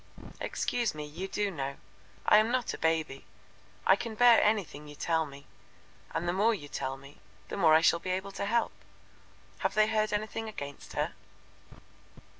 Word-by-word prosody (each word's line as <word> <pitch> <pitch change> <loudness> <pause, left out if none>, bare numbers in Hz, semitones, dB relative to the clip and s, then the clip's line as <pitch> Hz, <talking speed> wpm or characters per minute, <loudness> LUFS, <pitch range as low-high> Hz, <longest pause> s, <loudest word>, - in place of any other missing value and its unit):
"Excuse 240 -8 -1
me, 150 -1 -5
you 165 +6 -6
do 205 0 -1
know. 140 -4 -4 0.5
I - - +7
am 215 +1 +4
not 250 -1 0
a - - -5
baby. 160 -4 0 0.6
I 190 - +7
can 225 +2 -5
bear 240 0 +7
anything 195 -9 0
you 150 - -10
tell 160 0 0
me, 140 0 -12 0.7
and 175 - -2
the 175 - +1
more 215 +4 +3
you 145 -7 -9
tell 135 -1 -4
the 140 +1 -13
more 160 -5 +5
I 160 - +6
shall 170 0 +4
be 185 - -6
able 190 +2 -2
to 195 - -4
help. 230 +3 +1 0.9
Have - - -1
they 215 0 +5
heard 215 -1 +1
anything 215 +1 -2
against 140 -9 -8
her?" - - -1
185 Hz, 175 wpm, -30 LUFS, 150-215 Hz, 0.9 s, I